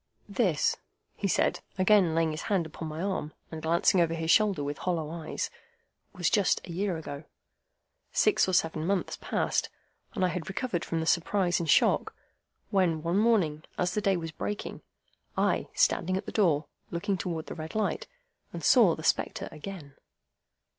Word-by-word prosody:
"This," 470 Hz, -1 st, +1 dB, 0.4 s
he 200 Hz, -, -1 dB
said, -, -, +1 dB, 0.2 s
again 185 Hz, -3 st, +4 dB
laying 165 Hz, -1 st, +2 dB
his 155 Hz, -, -4 dB
hand 190 Hz, -5 st, +2 dB
upon 160 Hz, +1 st, -7 dB
my 155 Hz, +3 st, -4 dB
arm, 190 Hz, -6 st, -2 dB, 0.2 s
and 160 Hz, -1 st, -6 dB
glancing 170 Hz, +3 st, +3 dB
over 165 Hz, -1 st, +1 dB
his 165 Hz, 0 st, 0 dB
shoulder 205 Hz, -8 st, +3 dB
with 145 Hz, 0 st, -4 dB
hollow 165 Hz, -4 st, -2 dB
eyes, 165 Hz, -1 st, -4 dB, 0.6 s
"was 180 Hz, -3 st, -1 dB
just 200 Hz, +1 st, +3 dB
a 180 Hz, -, -8 dB
year 185 Hz, 0 st, -1 dB
ago. 145 Hz, -2 st, -7 dB, 0.9 s
Six 420 Hz, -, +3 dB
or -, -, -1 dB
seven 165 Hz, -2 st, +1 dB
months 195 Hz, -1 st, 0 dB
passed, -, -, 0 dB, 0.5 s
and 190 Hz, -4 st, +2 dB
I -, -, +2 dB
had 170 Hz, 0 st, -4 dB
recovered 190 Hz, -3 st, -2 dB
from 165 Hz, -1 st, -2 dB
the -, -, -2 dB
surprise 175 Hz, +2 st, +2 dB
and 165 Hz, -2 st, -3 dB
shock, -, -, +3 dB, 0.6 s
when 175 Hz, -6 st, +2 dB
one 170 Hz, +4 st, +1 dB
morning, 195 Hz, -10 st, +2 dB, 0.2 s
as 180 Hz, 0 st, 0 dB
the 210 Hz, -, 0 dB
day 195 Hz, -2 st, +2 dB
was 165 Hz, -1 st, -5 dB
breaking, 205 Hz, +5 st, -5 dB, 0.6 s
I, -, -, +1 dB
standing 185 Hz, +2 st, +2 dB
at 195 Hz, -, -5 dB
the -, -, -6 dB
door, 160 Hz, -8 st, +2 dB, 0.2 s
looked 190 Hz, +3 st, -2 dB
towards 165 Hz, -3 st, -3 dB
the -, -, -4 dB
red 160 Hz, +3 st, -7 dB
light, 215 Hz, -1 st, -1 dB, 0.4 s
and -, -, -7 dB
saw -, -, +6 dB
the -, -, -9 dB
spectre -, -, 0 dB
again." 155 Hz, -3 st, -8 dB
175 Hz, 175 wpm, -29 LUFS, 160-195 Hz, 0.9 s, saw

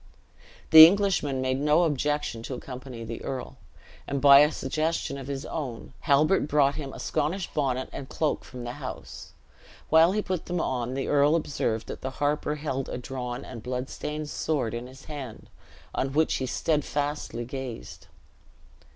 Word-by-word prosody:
The 160 Hz, 0 st, +13 dB
Englishman 180 Hz, -8 st, +1 dB
made 130 Hz, 0 st, 0 dB
no 150 Hz, +4 st, +4 dB
objection 145 Hz, -5 st, -1 dB
to 125 Hz, +3 st, -5 dB
accompany 125 Hz, -2 st, -8 dB
the 115 Hz, 0 st, -6 dB
earl; 130 Hz, -2 st, -5 dB, 0.5 s
and 140 Hz, -, -1 dB
by 140 Hz, 0 st, +9 dB
a 150 Hz, +1 st, +5 dB
suggestion 155 Hz, +1 st, -2 dB
of 135 Hz, -, -8 dB
his 140 Hz, 0 st, -4 dB
own, 130 Hz, -8 st, -5 dB
Halbert 150 Hz, +3 st, +3 dB
brought 145 Hz, -2 st, +3 dB
him 140 Hz, -3 st, -6 dB
a -, -, -10 dB
Scottish 160 Hz, +5 st, -2 dB
bonnet 130 Hz, -3 st, 0 dB
and 135 Hz, -, -7 dB
cloak 155 Hz, -2 st, -1 dB
from 125 Hz, -2 st, -9 dB
the 120 Hz, -, -4 dB
house. -, -, -8 dB, 0.6 s
While 165 Hz, +3 st, +6 dB
he 210 Hz, 0 st, 0 dB
put 185 Hz, -3 st, -3 dB
them 180 Hz, 0 st, -1 dB
on, 125 Hz, -4 st, -2 dB
the 135 Hz, -, -2 dB
earl 145 Hz, +2 st, +4 dB
observed 120 Hz, -8 st, -1 dB
that -, -, -7 dB
the 130 Hz, -, -3 dB
harper 150 Hz, +1 st, 0 dB
held 135 Hz, -3 st, -3 dB
a -, -, -4 dB
drawn 125 Hz, 0 st, -5 dB
and 115 Hz, -3 st, -8 dB
blood 125 Hz, +2 st, -4 dB
stained 150 Hz, 0 st, -5 dB
sword 135 Hz, -8 st, -1 dB
in 120 Hz, +1 st, -5 dB
his 130 Hz, +1 st, -14 dB
hand, 140 Hz, -7 st, -8 dB, 0.4 s
on 135 Hz, 0 st, -1 dB
which 160 Hz, +2 st, +2 dB
he 130 Hz, -, -3 dB
steadfastly 145 Hz, -4 st, -1 dB
gazed. 130 Hz, -2 st, -7 dB
140 Hz, 170 wpm, -27 LUFS, 130-150 Hz, 0.6 s, The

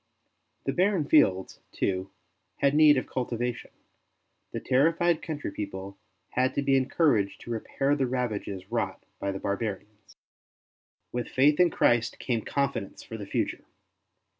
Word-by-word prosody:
The -, -, -1 dB
barren 185 Hz, -3 st, +2 dB
fields, 95 Hz, -13 st, +3 dB
too, 95 Hz, 0 st, -1 dB, 0.5 s
had 140 Hz, 0 st, +2 dB
need 150 Hz, -1 st, +7 dB
of 130 Hz, -, -1 dB
cultiva 120 Hz, -1 st, -2 dB
tion; -, -, -12 dB, 0.8 s
the -, -, -3 dB
terrified 165 Hz, +5 st, +2 dB
country 150 Hz, -9 st, -4 dB
people 100 Hz, -1 st, -6 dB, 0.3 s
had 130 Hz, +1 st, 0 dB
to 140 Hz, -, 0 dB
be 135 Hz, -1 st, +3 dB
encouraged 130 Hz, -, +2 dB
to 120 Hz, -, -7 dB
repair 135 Hz, +5 st, 0 dB
the 135 Hz, -3 st, 0 dB
ravages 105 Hz, -6 st, -3 dB
wrought 120 Hz, -, -2 dB, 0.2 s
by 100 Hz, -, -1 dB
the 95 Hz, -, -4 dB
barbarians. 105 Hz, 0 st, -5 dB, 1.0 s
With 120 Hz, 0 st, -3 dB
faith 145 Hz, +4 st, +3 dB
in 180 Hz, -1 st, +6 dB
Christ 120 Hz, -6 st, +2 dB
came 120 Hz, -3 st, -1 dB
confidence 140 Hz, -6 st, -2 dB
for 115 Hz, -, -8 dB
the 105 Hz, -2 st, -7 dB
future. -, -, -2 dB
125 Hz, 140 wpm, -28 LUFS, 105-145 Hz, 1.0 s, need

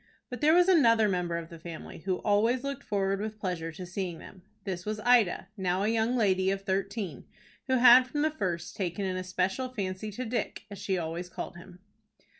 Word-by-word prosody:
But 250 Hz, -, -6 dB
there 310 Hz, +2 st, +5 dB
was 355 Hz, 0 st, +5 dB
another 230 Hz, -, +5 dB
member 180 Hz, -3 st, -1 dB
of 165 Hz, -1 st, -6 dB
the 165 Hz, -, -11 dB
family 165 Hz, 0 st, -8 dB
who 185 Hz, +2 st, -1 dB
always 225 Hz, +5 st, +2 dB
looked 280 Hz, 0 st, -4 dB
forward 195 Hz, -2 st, 0 dB
with 215 Hz, 0 st, -4 dB
pleasure 180 Hz, -5 st, -3 dB
to 180 Hz, +3 st, -7 dB
seeing 175 Hz, -1 st, -4 dB
them. 185 Hz, +3 st, -13 dB, 0.2 s
This 185 Hz, -3 st, -4 dB
was 215 Hz, +1 st, -3 dB
Ida, 220 Hz, -6 st, +3 dB
now 185 Hz, -1 st, 0 dB
a 210 Hz, -, +2 dB
young 225 Hz, +2 st, +1 dB
lady 190 Hz, -5 st, +2 dB
of 195 Hz, 0 st, -2 dB
thirteen, 195 Hz, -, -3 dB, 0.4 s
who 260 Hz, -, +2 dB
had 250 Hz, +1 st, +8 dB
from 295 Hz, +3 st, -1 dB
the 310 Hz, -, +2 dB
first 175 Hz, -, -3 dB
taken 195 Hz, +1 st, -2 dB
an 185 Hz, -1 st, -2 dB
especial 185 Hz, +7 st, -1 dB
fancy 200 Hz, -3 st, -4 dB
to 255 Hz, +5 st, -4 dB
Dick, 235 Hz, +2 st, -3 dB
as 200 Hz, -, -8 dB
she 190 Hz, -2 st, -1 dB
always 170 Hz, +1 st, -4 dB
called 175 Hz, -, -6 dB
him. 180 Hz, +1 st, -13 dB
195 Hz, 205 wpm, -29 LUFS, 180-230 Hz, 0.4 s, had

